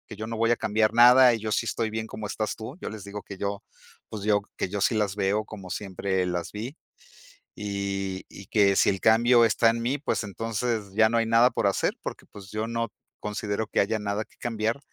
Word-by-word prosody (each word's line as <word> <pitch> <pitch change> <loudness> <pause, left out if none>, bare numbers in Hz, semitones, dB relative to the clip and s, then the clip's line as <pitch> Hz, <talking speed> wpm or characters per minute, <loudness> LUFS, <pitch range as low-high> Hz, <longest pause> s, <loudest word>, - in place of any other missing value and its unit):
yo 110 +2 -5
no 115 0 -4
voy 115 +1 +2
a - - +4
cambiar 110 0 +1
nada 125 +1 +8
y - - -5
yo 110 0 -4
sí - - +1
estoy 110 -2 -1
bien 110 0 -3
como 110 -1 -7
estás 105 +1 -3
tú". 115 +7 -8
Yo - - -4
les 105 -2 -8
digo 100 +1 -7
que 100 - -10
yo, 100 +1 -3 0.5
pues 105 -2 -6
yo, 105 -1 +3 0.2
que - - -2
yo 100 +1 -3
sí 115 - +2
las 105 -3 0
veo 105 +1 0
como 100 -4 -10
siempre 95 -1 -2
las 90 -1 -3
vi. 115 +7 -6 0.9
Y, 100 -2 -3
y 100 - -12
que 100 -3 +3
si - - +4
el 95 -1 +1
cambio 115 +3 +5
está 115 +1 +3
en 115 +1 -2
mí, 130 +5 0
pues 145 - -1
entonces 110 0 -3
ya 110 +1 +5
no 115 - 0
hay 115 - +1
nada 115 +2 +5
por - - 0
hacer - - +1
porque - - -6
pues 95 -2 -13
yo 110 +1 -2
no 115 0 -2 0.3
considero 105 +1 -3
que - - 0
haya 110 +3 +1
nada 105 +1 -2
que - - -28
cambiar, 115 +1 -1
110 Hz, 230 wpm, -26 LUFS, 100-115 Hz, 0.9 s, nada